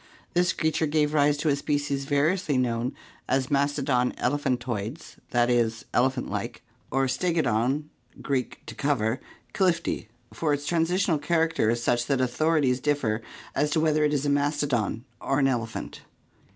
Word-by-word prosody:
This 175 0 +3
creature 160 0 0
gave 150 0 +1
rise 145 -1 +3
to 155 +1 0
a 140 - +3
species 145 -1 -1
variously 145 +2 +1
known 125 0 0 0.3
as 130 0 +1
Mastodon 140 -3 +1
elephantoides 125 -2 -2
(i. - - -2
£., 115 -2 +1
elephant 130 +1 +1
like) - - -4 0.3
or 135 0 +1
Stegodon 135 -3 +1 0.4
(Gr. 140 - -3
areyew, 130 -2 -1
to - - -7
cover) 130 -4 0 0.3
difti, 170 - 0 0.3
for 150 -3 +1
its 145 0 -7
transitional 170 0 +1
character 160 -5 +1
is 120 +1 0
such 120 0 +1
that 140 -2 +1
authorities 130 +1 +2
differ 125 -6 0 0.3
as 150 +1 +1
to 155 - +1
whether 155 -1 +2
it 150 - +3
is 145 -1 0
a - - +1
mastodon 140 -6 0
or 135 - 0
an 135 -2 +4
elephant. 115 -4 -3
140 Hz, 150 wpm, -26 LUFS, 125-150 Hz, 0.4 s, an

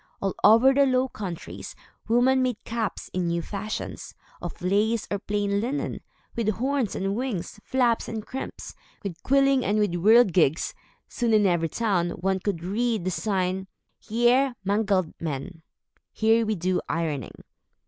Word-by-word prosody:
All 195 -1 -1
over 230 +6 +7
the 280 0 +4
Low 255 0 +2
Countries, 185 -8 -7 0.3
women 250 +3 +4
made 250 -3 -1
caps, 230 -2 -4
in 180 -1 -1
new 170 0 -1
fashions, 210 +3 -5 0.3
of 175 - -6
lace 205 +5 +1
or 200 - 0
plain 205 0 -1
linen, 265 +6 -3 0.3
with 230 -2 0
horns 260 -2 -1
and 195 +1 -1
wings, 230 -6 -4
flaps 245 -3 +1
and 220 -1 -5
crimps, 265 - -7 0.3
with 175 -4 -6
quilling 275 -1 +3
and 205 +2 +1
with 210 -3 +2
whirligigs. 180 - +4 0.3
Soon, 235 -3 +1
in 210 -1 +4
every 170 -3 +2
town, 190 -4 0
one 190 +1 0
could 180 -3 -3
read 220 +1 -1
the 185 - 0
sign 190 -1 -1 0.3
"Hier 240 +3 +2
mangled 195 -4 +1
men" 165 +2 -5 0.5
(Here 225 0 +2
we 215 - +1
do 180 0 0
ironing). 155 -7 -3
210 Hz, 150 wpm, -26 LUFS, 185-235 Hz, 0.5 s, over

